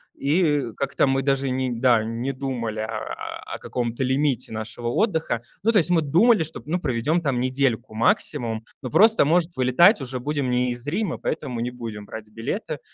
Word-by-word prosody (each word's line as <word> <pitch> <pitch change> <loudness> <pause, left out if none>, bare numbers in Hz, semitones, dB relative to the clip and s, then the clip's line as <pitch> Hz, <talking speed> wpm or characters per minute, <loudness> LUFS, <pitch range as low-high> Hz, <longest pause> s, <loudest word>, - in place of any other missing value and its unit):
и 145 -4 +1
как-то 140 0 +1
мы 135 0 +2
даже 135 0 0
ни 130 0 -1
да, 120 -3 +4
не 115 +4 -3
думали, 125 -5 -3
а, 110 0 -5
о - - -5
каком-то 120 +1 -3
лимите 130 -2 0
нашего 110 +2 -5
отдыха. 160 - 0 0.2
Ну, 225 - +4
то 225 - +3
есть 175 -3 +3
мы 170 -2 +4
думали, 175 - +4
что, 160 +1 -8
ну, 170 +5 -1
проведем 150 +4 0
там 140 -6 0
недельку 130 -3 0
максимум, 115 0 0 0.2
но 130 - -5
просто, 220 - +5
может, 170 +2 +2
вылетать 140 - +5
уже 130 -1 -4
будем 145 0 -2
не 125 0 +1
из 120 +1 -6
Рима, 180 +4 -1
поэтому 125 -5 -3
не 120 +1 -2
будем 115 -4 -7
брать 110 +1 -8
билеты. 115 +2 -4
130 Hz, 180 wpm, -24 LUFS, 120-155 Hz, 0.2 s, просто